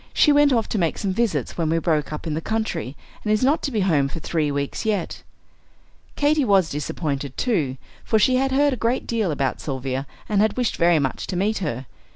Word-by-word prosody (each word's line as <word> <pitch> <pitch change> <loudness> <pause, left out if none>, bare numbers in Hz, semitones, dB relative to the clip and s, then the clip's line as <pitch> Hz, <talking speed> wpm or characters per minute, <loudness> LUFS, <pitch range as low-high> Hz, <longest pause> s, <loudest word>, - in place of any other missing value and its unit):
She 300 - +5
went 290 0 +5
off 230 -4 +2
to 215 - -1
make 165 -3 0
some 195 -2 -1
visits 230 -4 -1
when 160 -2 +1
we 165 - +2
broke 155 -3 0
up 150 - -6
in 160 - -2
the 160 - -2
country, 175 - -3 0.3
and 210 - 0
is 215 +3 +2
not 285 +5 +3
to - - -1
be 220 -4 0
home 155 -7 +2
for 140 - -6
three 155 -2 -1
weeks 140 0 -2
yet." 210 -6 -2 0.9
Katy 295 0 +2
was 195 -7 +3
disappointed, 145 -2 -3
too, 155 - 0 0.3
for 220 - +2
she 255 +4 +4
had 270 +1 +1
heard 285 +1 +3
a - - -3
great 235 +3 0
deal 225 -5 0
about 140 -3 -1
Sylvia 135 -1 -3 0.2
and 205 -2 +2
had 215 +2 +1
wished 245 -3 0
very 170 -1 +4
much 135 -3 -2
to - - -4
meet 210 +4 0
her. 135 -8 -3
185 Hz, 220 wpm, -23 LUFS, 150-230 Hz, 0.9 s, She